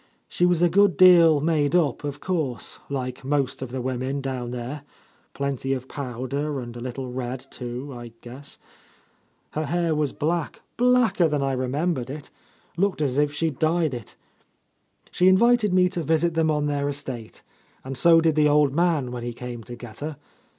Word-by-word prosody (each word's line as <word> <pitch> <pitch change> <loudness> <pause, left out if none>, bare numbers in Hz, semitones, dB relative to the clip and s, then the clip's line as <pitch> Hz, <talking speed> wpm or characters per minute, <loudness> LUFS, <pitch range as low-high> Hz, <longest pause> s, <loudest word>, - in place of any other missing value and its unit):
She 175 - +1
was 175 -1 +2
a - - +6
good 190 -1 +3
deal 170 -5 +7
made 155 0 +1
up, 165 -5 +1
of 145 -1 -4
course, 155 -11 -2
like 130 -2 -4
most 135 -1 -1
of 130 - -4
the 130 0 -4
women 130 +2 -2
down 130 -3 -4
there; 125 +4 -5 0.5
plenty 135 -1 -2
of 130 -1 -5
powder, 140 +2 -4
and 120 -1 -7
a 120 - -7
little 125 +1 -5
red, 125 0 -4
too, 125 +3 -6
I 120 -1 -9
guess. 130 +4 -9 0.9
Her 155 0 -3
hair 170 0 0
was 150 -2 0
black, 165 +1 -2
blacker 245 -7 +3
than 150 -2 0
I 135 - 0
remembered 130 +1 -1
It; 145 +1 -8 0.5
looked 195 -1 +1
as 135 -1 0
if 145 0 +2
she 160 +2 -1
dyed 160 +1 +1
it. 120 -3 -8 1.0
She 180 - +3
in 185 0 +7
vited 235 -2 +4
me 180 0 +4
to 175 - -3
visit 160 +2 +1
them 160 -1 +2
on 150 -1 +1
their 145 -1 -1
estate, 130 -6 -6 0.4
and 135 +1 -6
so 165 +4 +6
^id 160 -1 +3
the 150 0 +4
old 145 -2 +3
man, 160 -6 +1
when 125 -1 -5
he 120 0 -4
came 120 -1 -7
to 120 - -8
get 120 -2 -11
her. 150 -1 -5
145 Hz, 185 wpm, -24 LUFS, 130-165 Hz, 1.0 s, deal